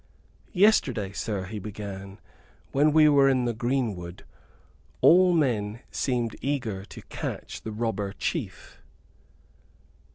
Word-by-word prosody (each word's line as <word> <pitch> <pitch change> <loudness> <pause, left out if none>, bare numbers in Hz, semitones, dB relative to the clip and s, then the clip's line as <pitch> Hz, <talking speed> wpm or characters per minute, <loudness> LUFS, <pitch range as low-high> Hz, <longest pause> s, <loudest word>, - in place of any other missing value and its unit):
"Yesterday, 140 - +3
sir," 100 -2 -3
he 105 +3 -6
began, 100 -1 -8 0.5
"when 145 +3 +3
we 155 0 +6
were 140 -2 +5
in 130 -2 +2
the 120 - 0
greenwood, 110 -8 -3 0.7
all 180 +2 +6
men 120 -9 0
seemed 120 -4 -1
eager 120 -9 -2
to - - -12
catch - - -6
the 110 - -6
robber 105 -3 -2
chief." - - -5
115 Hz, 110 wpm, -26 LUFS, 100-140 Hz, 0.7 s, we